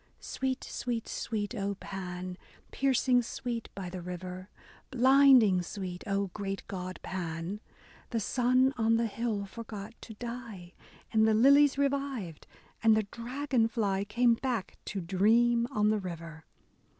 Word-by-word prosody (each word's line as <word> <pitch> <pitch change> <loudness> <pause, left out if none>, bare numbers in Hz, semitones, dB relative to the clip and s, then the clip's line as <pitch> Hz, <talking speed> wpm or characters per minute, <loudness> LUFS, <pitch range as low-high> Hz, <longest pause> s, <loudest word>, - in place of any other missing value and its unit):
Sweet, 260 -1 -3
sweet, 235 -2 -3
sweet, 210 0 -3
O 200 -3 -2
Pan! 180 -2 -6 0.4
Piercing 260 -2 +3
sweet 235 0 -5
by 190 -2 -5
the 180 0 -6
river! 180 +1 -7 0.4
Blinding 260 -6 +6
sweet, 180 0 -6
O 200 -1 -1
great 195 -1 -4
god 185 -1 -5
Pan! 175 +2 -4 0.5
The 230 - -1
sun 255 +4 +2
on 225 0 +3
the 230 - +1
hill 220 -2 -2
forgot 215 0 -8
to 220 - -10
die, 230 -6 -7 0.4
And 220 0 +5
the 220 - +4
lilies 280 +4 +6
revived, 275 - -2 0.3
and 220 -1 +5
the 220 - +2
dragon 250 0 0
fly 205 -4 0
Game 235 +3 +3
back 230 -4 -3
to 195 - -4
dream 230 +7 +3
on 210 0 +2
the 215 - +1
river. 165 -4 -7
220 Hz, 140 wpm, -30 LUFS, 190-245 Hz, 0.5 s, Blinding